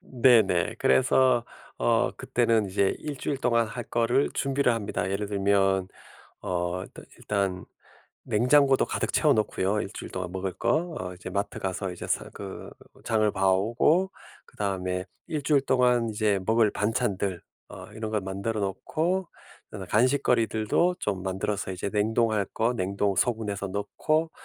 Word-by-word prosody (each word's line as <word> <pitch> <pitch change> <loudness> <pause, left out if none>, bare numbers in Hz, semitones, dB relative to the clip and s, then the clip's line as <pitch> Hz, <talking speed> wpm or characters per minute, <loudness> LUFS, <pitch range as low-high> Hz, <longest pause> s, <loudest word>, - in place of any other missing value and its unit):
네네. 115 -9 +3
그래서 120 - +3 0.3
어 - - +2
그때는 115 -3 +1
이제 95 0 +1
1 150 -2 -5
주일 135 +1 -3
동안 115 -3 +2
할 120 +2 -6
거를 120 +4 +1
준비를 135 -2 +1
합니다. 100 -4 -3
예를 100 +1 -2
들면 95 -2 +1 0.5
어 90 0 -2
일단 - - -11
일단 95 -3 -2 0.6
냉장고도 135 +4 +4
가득 - - -2
채워 - - +4
놓고요. 105 -1 0
1 - - -5
주일 - - -8
동안 90 -1 -4
먹을 95 -1 -3
거 160 +8 0
어 90 0 -5
이제 90 +1 -8
마트 100 +2 -3
가서 95 0 -3
이제 90 - -7
사 - - -1
그 95 -1 -8 0.3
장을 110 -2 +2
봐오고 115 - +2 0.3
그다음에 95 -2 -3 0.2
1 150 -3 -3
주일 140 -1 +3
동안 125 -3 +2
이제 105 -2 +1
먹을 110 0 +3
반찬들 100 -4 -1 0.3
어 - - -9
이런 110 0 -5
걸 105 - 0
만들어 100 +4 -3
놓고 160 - -1 0.4
그다음에 100 -3 -7
간식거리들도 125 +5 +2
좀 100 -3 -2
만들어서 95 +1 -2
이제 95 +2 -4
냉동할 110 0 +1
것 115 +2 +1
냉동 100 0 0
소분해서 105 -3 -1
넣고 155 - -1
105 Hz, 295 characters per minute, -27 LUFS, 95-120 Hz, 0.6 s, 냉장고도